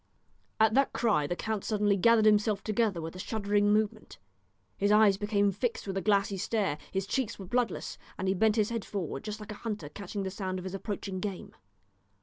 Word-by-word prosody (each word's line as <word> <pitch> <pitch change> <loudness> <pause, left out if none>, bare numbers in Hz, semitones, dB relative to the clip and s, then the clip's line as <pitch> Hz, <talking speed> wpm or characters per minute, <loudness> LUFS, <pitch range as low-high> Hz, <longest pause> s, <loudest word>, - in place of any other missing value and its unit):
At 220 0 +5
that 275 +2 +3
cry 200 -11 +2
the 175 - -2
count 220 +1 -3
suddenly 205 -2 +2
gathered 220 +3 +4
himself 210 -1 +3
together 215 -4 +1
with 165 +2 -6
a - - -8
shuddering 205 0 +1
movement, 215 +1 0 0.6
his 200 +1 +1
eyes 210 -2 +6
became 205 0 +1
fixed 225 +5 -2
with 195 -1 -4
a 195 - 0
glassy 200 -1 +2
stare, 195 -6 -1
his 190 0 -1
cheeks 230 +2 -2
were 195 - -8
bloodless, 235 +1 -1 0.2
and 190 - -2
he 190 - +3
bent 215 +2 +3
his 215 0 +1
head 230 -3 -2
forward 195 -3 -4
just 215 0 -5
like 210 0 -8
a 210 - -9
hunter 210 -10 -4
catching 200 +4 -5
the 190 - -3
sound 185 -1 -3
of 185 - -6
his 190 - -5
approaching 195 -1 -4
game. 195 -2 -5
205 Hz, 205 wpm, -30 LUFS, 195-220 Hz, 0.6 s, eyes